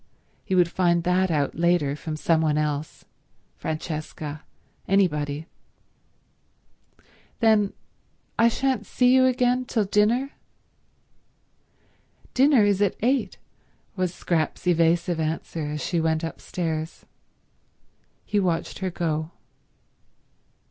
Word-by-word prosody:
He 190 - -1
would 180 -2 +5
find 170 -2 +2
that 180 +1 +2
out 145 -4 0
later 170 -4 +1
from 155 +1 -5
some 160 +1 +2
one 155 -2 +1
else—Francesca, 155 0 -5 0.5
anybody. 150 -6 +1 1.9
"Then 215 -3 +3 0.6
I 230 - +4
shan't 260 +3 0
see 250 0 +3
you 260 0 +5
again 250 0 +1
till 225 -3 0
dinner?" 225 +7 +2 2.0
"Dinner 265 -3 +5
is 205 -1 +2
at 200 -3 +2
eight," 260 +3 +1 0.6
was 185 -2 -1
Scrap's 170 -3 -2
evasive 170 0 +2
answer 160 0 -3
as 150 0 -4
she 170 -2 0
went 160 0 0
upstairs. 165 -1 -4 1.2
He 210 - 0
watched 175 -4 -1
her 190 -1 -2
go. 160 -3 -2
175 Hz, 100 wpm, -25 LUFS, 155-210 Hz, 2.0 s, would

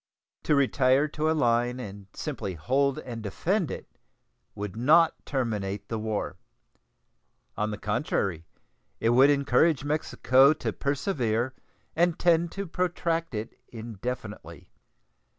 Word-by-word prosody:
To 150 - +3
retire 135 +1 +3
to 155 +1 -1
a - - +3
line 120 -1 +1
and 100 -4 -8
simply 95 -2 -4
hold 135 - +1
and 120 -3 -6
defend 170 - -1
it - - -6 0.7
would 100 -1 -5
not 160 +8 +5
terminate 105 -7 -2
the 110 - -2
war. 110 -1 -3 1.2
On 105 0 -1
the 105 - -4
contrary, 100 - -2 0.5
it 115 - +2
would 130 +4 +6
encourage 140 +1 +3
Mexico 145 -2 +3
to - - -4
persevere 130 - -1 0.4
and 175 0 +2
tend 170 -1 +3
to 200 0 -4
protract 170 -4 -1
it 105 +2 -4
indefinitely. 115 -1 -7
130 Hz, 120 wpm, -27 LUFS, 110-155 Hz, 1.2 s, would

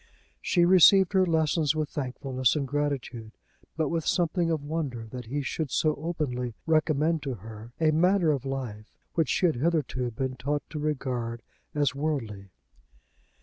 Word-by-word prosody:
She 175 -2 +3
received 190 +1 +6
her 190 -1 +4
lessons 160 -2 +2
with 155 -1 -1
thankfulness 130 -2 -1
and 140 -3 -1
gratitude, 130 -6 -3 0.4
but 155 -3 +1
with 165 -1 -1
something 170 0 +1
of 160 -3 -1
wonder 145 -7 -3
that 125 +2 -8
he 145 +4 -2
should 155 +2 -3
so 155 +4 +2
openly 135 -7 -3
recommend 155 0 +2
to 135 -3 -3
her 110 +2 -11
a 160 -1 +4
manner 175 +1 +3
of 140 -4 -1
life 125 -6 -6 0.2
which 165 -2 +1
she - - +2
had 160 -8 +2
hitherto 145 -4 0
been 130 +3 -4
taught 145 +1 -2
to 150 - -4
regard 125 -6 -3 0.3
as 145 -4 +2
worldly. 125 -10 -3
145 Hz, 155 wpm, -27 LUFS, 125-160 Hz, 0.4 s, received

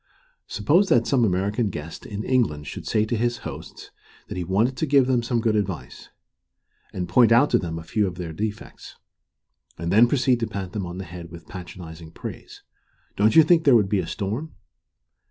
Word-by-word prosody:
Suppose 160 - +2
that 120 -1 +4
some 130 -4 +2
American 100 +3 0
guest 80 -3 -8
in 105 0 -5
England 110 - 0
should - - -7
say 110 -1 +2
to 120 - -2
his 120 +1 0
hosts - - -9 0.4
that - - -5
he 90 - -3
wanted 105 +9 +1
to 160 - -1
give 140 -2 +5
them 125 -2 +2
some 120 0 -1
good 110 -1 +1
advice, 100 -5 -4 0.8
and 90 -1 -4
point 115 +6 +4
out 120 +5 +5
to - - +4
them 80 -2 -4
a 80 - -7
few 105 +4 0
of 90 - -5
their 85 -2 -6
defects, 105 +4 -6 0.8
and 85 +1 -3
then 110 +5 +6
proceed 130 -1 +2
to 115 - -1
pat 100 -4 -5
them 100 -5 -4
on 85 +1 -7
the 95 - -6
head 85 0 -9
with 85 0 -12
patronizing 85 -3 -9
praise, 80 - -9 0.5
don't 105 +6 +3
you 160 - +9
think 165 0 +4
there 140 -5 +6
would 105 -4 +3
be 100 -1 +1
a - - -3
storm? 110 +11 -4
105 Hz, 200 wpm, -24 LUFS, 90-120 Hz, 0.8 s, you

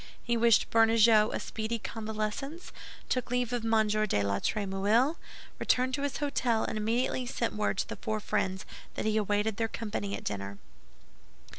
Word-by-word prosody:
He 235 - 0
wished 230 -1 +4
Bernajoux 225 -1 +5
a - - -2
speedy 220 +1 -3
convalescence, 220 - -4 0.4
took 255 -2 -1
leave 245 0 0
of 240 -2 -1
M. 225 -1 +3
de 210 - +1
la 100 0 0
Trémouille, 210 +8 +1 0.4
returned 255 +1 +2
to 275 - -1
his 285 -1 -2
hôtel, 255 -6 0
and - - -3
immediately 235 +4 0
sent 235 -2 -2
word 210 -2 -1
to - - -1
the - - -6
four 220 -2 -2
friends 190 -2 -1 0.3
that - - -3
he 215 0 +1
awaited 210 0 +1
their 225 - +1
company 210 -3 -4
at - - -8
dinner. 100 -1 -4
220 Hz, 165 wpm, -30 LUFS, 210-240 Hz, 0.4 s, Bernajoux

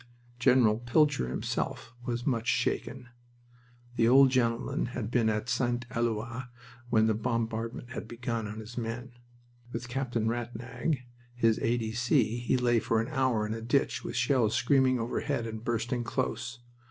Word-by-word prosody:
General 120 -3 +4
Pilcher 130 - +2
himself 115 - -3
was 120 0 -3
much 120 -5 0
shaken. 120 +1 -1 0.9
The 115 - +4
old 135 +2 +7
gentleman 120 -1 +1
had 115 -2 -3
been 115 -3 +3
at 110 +1 -1
St. 120 0 0
Eloi 115 +2 -2 0.4
when 110 -2 +4
the 110 - +3
bombardment 115 +1 -2
had - - -5
begun 115 -2 -3
on 105 +1 -6
his 110 +3 -6
men. 120 +2 -4 0.6
With 120 +1 -5
Captain 120 -3 -1
Rattnag 120 +4 -2 0.3
his 115 -2 +3
A. 120 +2 +1
D. 110 -2 -3
C. 120 0 +2
he 120 +2 +1
lay 120 -2 +3
for 110 0 +1
an 115 +3 -2
hour 130 -7 +1
in 105 - -2
a 115 - -5
ditch 130 +5 +1
with 120 - -5
shells 125 -3 +2
screaming 130 -1 +3
overhead 120 +2 -1
and 110 -1 -6
bursting 120 +1 -1
close. 120 -1 -2
120 Hz, 155 wpm, -30 LUFS, 115-125 Hz, 0.9 s, old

